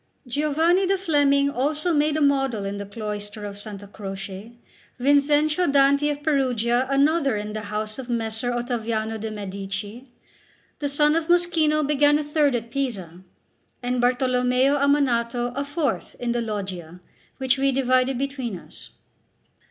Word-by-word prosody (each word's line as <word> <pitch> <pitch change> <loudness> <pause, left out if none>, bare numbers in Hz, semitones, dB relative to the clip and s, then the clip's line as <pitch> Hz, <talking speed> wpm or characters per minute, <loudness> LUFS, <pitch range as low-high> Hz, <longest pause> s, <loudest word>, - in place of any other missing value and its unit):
Giovanni 310 +8 +2
the 390 +1 +2
Fleming 285 -5 +2
also 300 +6 0
made 300 0 +2
a - - -1
model 270 -7 +1
in 200 +1 -4
the 200 0 -6
cloister 210 0 -6
of 205 - -5
S. 205 -2 -8
Croce; 195 +1 -7 0.5
Vinzenzio 295 +5 +3
Danti 280 +1 +4
of 290 0 -4
Perugia 255 -4 +1
another 280 -2 +2
in 210 0 -5
the 215 - -4
house 215 +2 -3
of 255 -1 -7
Messer 225 0 -2
Ottaviano 230 -2 -2
de' 220 +1 -4
Medici; 200 +3 -6 0.7
the 290 - -1
son 295 +2 +2
of 330 -1 0
Moschino 330 -4 +2
began 295 0 +4
a 300 - -2
third 295 -2 +2
at 235 0 -4
Pisa, 195 -11 -4 0.6
and 250 0 0
Bartolommeo 250 +2 +2
Ammanato 245 -4 +1
a 280 - -1
fourth 290 +1 -2
in 245 -1 -1
the 240 0 0
Loggia, 190 -6 -5 0.4
which 265 0 +1
we 275 0 +3
divided 255 0 +2
between 265 -6 -3
us. - - -13
255 Hz, 145 wpm, -24 LUFS, 220-290 Hz, 0.7 s, Danti